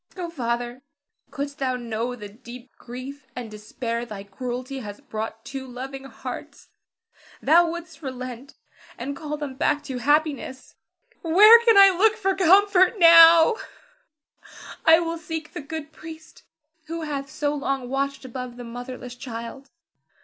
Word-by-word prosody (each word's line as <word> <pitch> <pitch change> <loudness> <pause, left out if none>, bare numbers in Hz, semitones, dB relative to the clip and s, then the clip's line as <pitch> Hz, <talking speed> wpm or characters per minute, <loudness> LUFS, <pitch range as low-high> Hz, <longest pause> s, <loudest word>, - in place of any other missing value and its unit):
Oh, 345 -2 -5
Father, 240 -3 -3 0.5
couldst 285 0 -6
thou 260 -2 -1
know 240 0 -4
the 210 -4 -9
deep 240 +4 -13
grief 260 +3 -9
and 240 -3 -7
despair 230 +2 -5
thy 210 -4 -8
cruelty 250 +6 -6
has 205 -4 -8
brought 220 +1 -6
two 270 -1 -7
loving 265 +2 -8
hearts, 270 - -9 0.7
thou 335 +3 +4
wouldst 335 -1 -8
relent, 255 -1 -7 0.4
and 275 +4 -5
call 300 +1 -5
them 290 -3 -5
back 290 +2 0
to 260 -3 -5
happiness. 290 -2 -1 0.5
Where 420 +8 +7
can 455 -3 +5
I 390 -1 +8
look 435 +4 +3
for 390 -3 0
comfort 380 +2 +4
now? 335 +1 +8
[Weeps.] 455 -10 -18 0.3
I 325 0 +9
will 335 -1 -3
seek 320 -1 -6
the - - -6
good 310 +1 -7
priest 315 0 -13 0.4
who 330 +1 -5
hath 280 -2 -4
so 290 +1 -2
long 275 -3 -3
watched 275 +1 -3
above 250 -1 -7
the 245 - -8
motherless 245 +1 -8
child. 245 +2 -8
275 Hz, 145 wpm, -24 LUFS, 245-325 Hz, 0.7 s, I